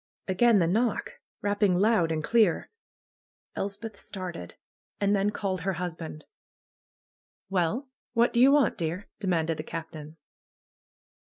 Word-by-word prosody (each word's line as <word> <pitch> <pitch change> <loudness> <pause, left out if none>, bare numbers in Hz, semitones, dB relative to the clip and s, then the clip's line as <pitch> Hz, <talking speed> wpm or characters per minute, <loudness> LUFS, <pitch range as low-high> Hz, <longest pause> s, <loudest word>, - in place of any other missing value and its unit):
Again 215 +4 +4
the 175 - +4
knock! 220 +6 0 0.2
Eapping 205 -3 +2
loud 205 -6 +3
and 155 -1 -1
clear. 220 -2 +2 0.8
Elspeth 205 +2 -4
started. 180 - -7 0.4
And 200 0 +2
then 200 +1 +2
called 195 -3 -2
her 190 +3 -1
husband. 165 -3 -6 1.3
'^Well! 195 - 0 0.3
What 235 0 +3
do 235 - +2
you 265 +3 +7
want, 285 -5 +3
dear?*' 170 +4 -3
demanded 165 -5 0
the 155 - -4
Captain. 155 -1 -7
190 Hz, 125 wpm, -28 LUFS, 165-215 Hz, 1.3 s, you